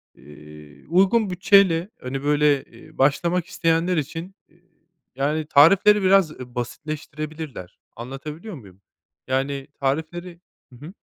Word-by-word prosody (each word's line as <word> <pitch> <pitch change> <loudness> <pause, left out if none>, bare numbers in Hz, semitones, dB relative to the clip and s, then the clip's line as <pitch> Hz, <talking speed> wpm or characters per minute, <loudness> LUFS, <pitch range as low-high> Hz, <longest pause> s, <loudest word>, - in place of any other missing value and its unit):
eee, 75 0 -15
uygun 195 +5 +3
bütçeyle, 180 -1 +3
hani, 135 +2 -5
böyle, 145 -1 +2
eee, - - -18
başlamak 170 +6 +1
isteyenler 165 +1 0
için, 165 +6 -5
eee, 170 +2 -29 0.5
yani, 150 +3 -1
tarifleri 195 +8 +5
biraz, 190 -4 +4
eee, 125 -3 -11
basitleştirebilirler, 150 - -6 0.2
anlatabiliyor 150 - -8
muyum? 100 -6 -15 0.5
Yani, 135 +1 -2
tarifleri 160 +5 -3 0.3
Hı - - -13
hı. 180 - -10
155 Hz, 115 wpm, -23 LUFS, 135-175 Hz, 0.5 s, tarifleri